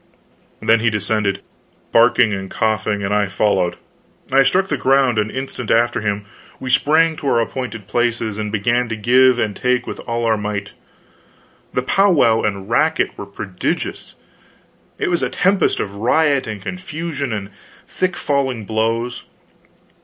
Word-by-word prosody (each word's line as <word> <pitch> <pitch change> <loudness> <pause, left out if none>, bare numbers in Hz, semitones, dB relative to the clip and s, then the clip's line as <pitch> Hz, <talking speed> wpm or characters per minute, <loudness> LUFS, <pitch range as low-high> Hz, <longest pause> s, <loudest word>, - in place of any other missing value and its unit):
Then 115 0 +4
he 115 +1 +2
descended, 105 -2 -1 0.5
barking 115 -1 +4
and 95 -1 -5
coughing, 110 -2 -1
and 100 +1 -1
I 105 -1 +2
followed. 95 -2 +1 0.6
I 135 +1 +5
struck 185 +8 +2
the 150 - -1
ground 130 -3 +2
an 105 0 0
instant 130 -2 -5
after 115 0 +2
him; 105 -1 -2 0.3
we 130 -1 -4
sprang 155 +5 +3
to 145 - -5
our 120 - +3
appointed 115 -3 -4
places, 115 -1 -1
and 105 -1 -3
began 120 +3 0
to 115 - -2
give 125 +3 +4
and 105 -4 -1
take 125 -1 0
with - - -6
all 115 0 -1
our 110 -1 +2
might. 105 -1 -4 1.0
The 125 - +1
powwow 150 - +3
and 100 -2 -2
racket 155 +8 +1
were 100 - -8
prodigious; 95 -2 -4 0.8
it - - -1
was 175 -3 0
a 125 - 0
tempest 190 +8 +1
of 100 - -3
riot 140 +6 +2
and 105 -3 -6
confusion 160 - -4
and 105 -2 -4 0.4
thick 185 -1 -1
falling 130 -6 -1
blows. 115 +3 -1
115 Hz, 155 wpm, -19 LUFS, 105-135 Hz, 1.0 s, I